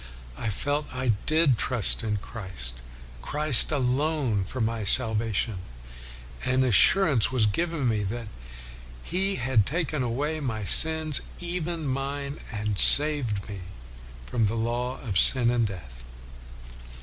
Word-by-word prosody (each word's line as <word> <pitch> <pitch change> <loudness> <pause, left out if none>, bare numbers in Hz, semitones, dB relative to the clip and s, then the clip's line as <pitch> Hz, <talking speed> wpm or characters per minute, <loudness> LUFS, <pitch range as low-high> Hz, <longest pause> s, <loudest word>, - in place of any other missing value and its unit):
I 110 - -5
felt 145 +8 -4
I 130 -1 -3 0.2
did 155 -6 +2
trust 125 -5 +2
in 105 -2 -2
Christ, 95 - -6 0.5
Christ 150 -3 +6
alone, 135 -4 -1
for 130 - -8 0.2
salvation, 110 -2 0 0.8
and 130 0 0
an 130 - 0
assurance 135 - +4
was 125 -4 +1
given 160 +5 -2
me 110 -3 -1
that 115 +3 -6 0.8
He 195 +3 -2
had 125 - 0
taken 150 - -3
away 140 +6 -3
my 110 -7 -5
sins, 160 +3 +4 0.2
even 170 -2 -5
mine, 140 +1 -5
and 105 -3 -4
saved 140 -9 +4
me 100 -2 -8 0.7
from 115 - -1
the 110 - -4
law 120 +3 -3
of 100 -8 -1
sin 120 +1 +4
and 120 -2 0
death.' 65 -11 -11
125 Hz, 125 wpm, -25 LUFS, 110-150 Hz, 0.8 s, Christ